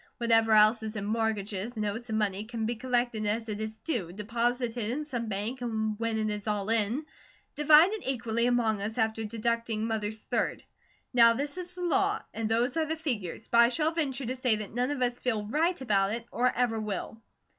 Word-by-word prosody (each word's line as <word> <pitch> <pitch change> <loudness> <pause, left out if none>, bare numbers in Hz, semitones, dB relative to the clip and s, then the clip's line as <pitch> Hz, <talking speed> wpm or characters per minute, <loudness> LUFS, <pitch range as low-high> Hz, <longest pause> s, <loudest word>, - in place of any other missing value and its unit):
Whatever 225 -1 +3
else 215 +2 +6
is 220 0 -5
in 200 -2 -3
mortgages, 220 0 -2
notes, 215 +3 -3
and 220 - 0
money 205 -2 0
can 225 -1 -3
be 235 - 0
collected 240 -2 -1
as 225 +2 -1
it 215 0 -4
is 220 0 -4
due, 220 - -2
deposited 230 +2 -1
in 295 +6 -2
some 240 -6 -4
bank, 215 +5 -3
and 220 -2 -1
when 230 -1 -1
it 215 -1 0
is 210 0 -6
all 210 0 -1
in, 230 +6 +2 0.5
divided 310 +8 +5
equally 235 -2 0
among 225 -4 +1
us, 220 +3 -4
after 220 -1 0
deducting 230 0 -1
Mother's 220 -1 -2
third. - - -1 0.5
Now 230 -1 +7
this 285 +4 -3
is 360 0 -6
the 360 0 -6
law, 390 +4 +1
and 220 0 -2
those 240 +5 +1
are 320 - +2
the 320 - -1
figures, 230 - -4
but 235 - +3
I 235 0 +7
shall 310 +5 +1
venture 280 -5 -2
to 255 +3 -2
say 250 -3 +2
that 210 -1 -6
none 245 +2 0
of 285 -3 -1
us 245 0 -1
feel 220 -5 -1
RIGHT 320 - 0
about 200 -4 +2
it, 230 0 -4
or 250 +1 +2
ever 235 -2 0
will." 215 +1 -5
230 Hz, 205 wpm, -29 LUFS, 215-250 Hz, 0.5 s, Now